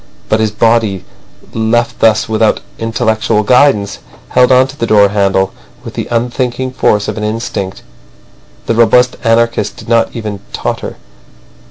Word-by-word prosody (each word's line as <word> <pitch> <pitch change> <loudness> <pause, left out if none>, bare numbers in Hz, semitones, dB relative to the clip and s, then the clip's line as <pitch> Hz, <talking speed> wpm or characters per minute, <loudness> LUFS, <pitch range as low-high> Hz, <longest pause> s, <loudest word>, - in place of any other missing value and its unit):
But 110 - +2
his 110 -1 +1
body, 110 -3 +1 0.5
left 115 +1 0
thus 110 -1 +3
without 110 0 +1 0.2
intellectual 115 -1 0
guidance, 110 -4 +2 0.3
held 125 0 +3
on 130 0 +5
to 135 - -10
the 115 -5 -2
door 100 -2 +5
handle 95 -1 +1 0.3
with - - -8
the - - -4
unthinking 125 +2 -2
force 105 -5 +1
of - - -4
an - - -4
instinct. 105 -3 -4 0.8
The - - 0
robust 120 +2 +3
anarchist 115 -2 +1
did - - -12
not 115 -1 +1
even 105 -3 -5
totter. - - -4
115 Hz, 145 wpm, -13 LUFS, 105-120 Hz, 0.8 s, on